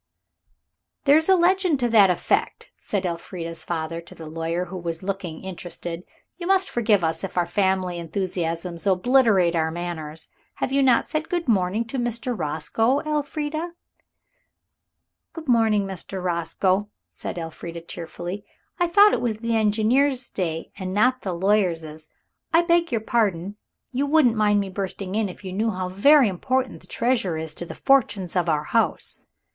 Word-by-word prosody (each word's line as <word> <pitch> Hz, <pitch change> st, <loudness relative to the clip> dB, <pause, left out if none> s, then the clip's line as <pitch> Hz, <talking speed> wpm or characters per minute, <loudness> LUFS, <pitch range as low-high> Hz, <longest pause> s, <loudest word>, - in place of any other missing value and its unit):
"There 285 Hz, 0 st, +6 dB
is 320 Hz, +3 st, +1 dB
a 380 Hz, -, +7 dB
legend 360 Hz, -3 st, +3 dB
to 240 Hz, -, +2 dB
that 210 Hz, -4 st, +6 dB
effect," 180 Hz, -, -1 dB
said 200 Hz, -2 st, -2 dB
Elfrida's 170 Hz, -1 st, -5 dB
father 165 Hz, 0 st, -3 dB
to 170 Hz, -, -14 dB
the 160 Hz, -, -9 dB
lawyer, 165 Hz, +3 st, -2 dB
who 185 Hz, +1 st, -7 dB
was 170 Hz, 0 st, -4 dB
looking 190 Hz, -4 st, -4 dB
interested. 175 Hz, -2 st, -6 dB, 0.4 s
"You 345 Hz, -, -4 dB
must 385 Hz, 0 st, +3 dB
forgive 215 Hz, -5 st, +2 dB
us 160 Hz, +3 st, -1 dB
if 195 Hz, -, -6 dB
our 175 Hz, -, +3 dB
family 185 Hz, -1 st, 0 dB
enthusiasms 170 Hz, 0 st, -3 dB
obliterate 195 Hz, -3 st, +4 dB
our 160 Hz, -1 st, +1 dB
manners. 160 Hz, -2 st, -5 dB, 0.3 s
You 265 Hz, -, -1 dB
have 275 Hz, -, +4 dB
not 250 Hz, -3 st, +4 dB
said 310 Hz, 0 st, -3 dB
good 345 Hz, -3 st, -2 dB
morning 205 Hz, 0 st, +1 dB
to 255 Hz, +3 st, -4 dB
Mr. 240 Hz, +1 st, -2 dB
Roscoe, 205 Hz, -, 0 dB
Elfrida." 305 Hz, +2 st, -3 dB, 1.6 s
"Good 320 Hz, -2 st, -9 dB
morning, 220 Hz, -4 st, +3 dB
Mr. 190 Hz, 0 st, -5 dB
Roscoe," 185 Hz, +3 st, 0 dB, 0.2 s
said -, -, -6 dB
Elfrida 165 Hz, 0 st, -6 dB
cheerfully. 175 Hz, +3 st, -7 dB, 0.4 s
"I 350 Hz, -, +3 dB
thought 405 Hz, +4 st, +6 dB
it -, -, 0 dB
was 230 Hz, -3 st, -1 dB
the 230 Hz, +1 st, -1 dB
engineer's 235 Hz, +5 st, +2 dB
day 165 Hz, -4 st, -3 dB
and 185 Hz, 0 st, -4 dB
not 255 Hz, +4 st, +3 dB
the 185 Hz, -3 st, -3 dB
lawyer's. 170 Hz, -5 st, 0 dB, 0.4 s
I 335 Hz, +1 st, +5 dB
beg 340 Hz, -2 st, +2 dB
your 230 Hz, -2 st, 0 dB
pardon, 205 Hz, -5 st, 0 dB, 0.4 s
you 275 Hz, +2 st, 0 dB
wouldn't 285 Hz, -5 st, +4 dB
mind 210 Hz, -1 st, +3 dB
me 195 Hz, -, -4 dB
bursting 190 Hz, 0 st, -4 dB
in 215 Hz, -1 st, 0 dB
if 180 Hz, -, -11 dB
you 185 Hz, -1 st, -6 dB
knew 220 Hz, +4 st, 0 dB
how 185 Hz, -3 st, -3 dB
very 265 Hz, +8 st, +5 dB
important 255 Hz, +6 st, -1 dB
the -, -, -17 dB
treasure 230 Hz, -9 st, 0 dB
is 160 Hz, 0 st, -4 dB
to 175 Hz, -, -5 dB
the -, -, -8 dB
fortunes 210 Hz, -10 st, +2 dB
of 175 Hz, -2 st, +1 dB
our 150 Hz, -1 st, +1 dB
house." -, -, 0 dB
195 Hz, 165 wpm, -24 LUFS, 175-250 Hz, 1.6 s, a